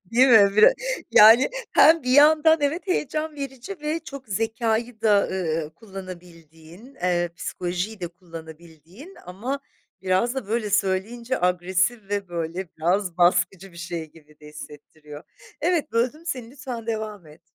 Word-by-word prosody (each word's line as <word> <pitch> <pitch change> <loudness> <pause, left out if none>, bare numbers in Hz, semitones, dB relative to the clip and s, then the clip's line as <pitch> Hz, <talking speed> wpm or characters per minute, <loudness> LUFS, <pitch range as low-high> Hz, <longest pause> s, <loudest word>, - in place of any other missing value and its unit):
değil 255 +3 +5
mi? 200 -4 +6
Bir 215 - +8 0.4
yani, 225 - +7 0.2
hem 320 -1 +6
bir 250 - -2
yandan, 310 +3 +6
evet, 300 +7 -1
heyecan 310 -3 -2
verici 275 +6 -7
ve 305 +2 -2
çok 265 -3 -10
zekâyı 225 +2 -2
da, 210 -2 +4
ııı, 165 -4 -2
kullanabildiğin, 180 - -12
eee, 175 -3 -1
psikolojiyi 180 +5 -4
de 175 - -4
kullanabildiğin 170 - -13
ama 240 +10 -5 0.4
biraz 190 +7 +1
da 260 -7 -5
böyle 220 -2 -2
söyleyince 210 +6 -1
agresif 185 +4 0
ve 200 -2 -3
böyle 170 +1 -4
biraz 180 +2 0
baskıcı 180 +2 +2
bir 170 - -16
şey 170 -3 -6
gibi 150 -2 -21
de 150 - -14
hissettiriyor. 150 0 -12 0.4
Evet, 330 -5 0
böldüm 255 +8 -1
seni, 250 -7 -5
lütfen 255 -4 -8
devam 215 -5 -5
et. 150 +2 -17
200 Hz, 140 wpm, -23 LUFS, 175-250 Hz, 0.4 s, Bir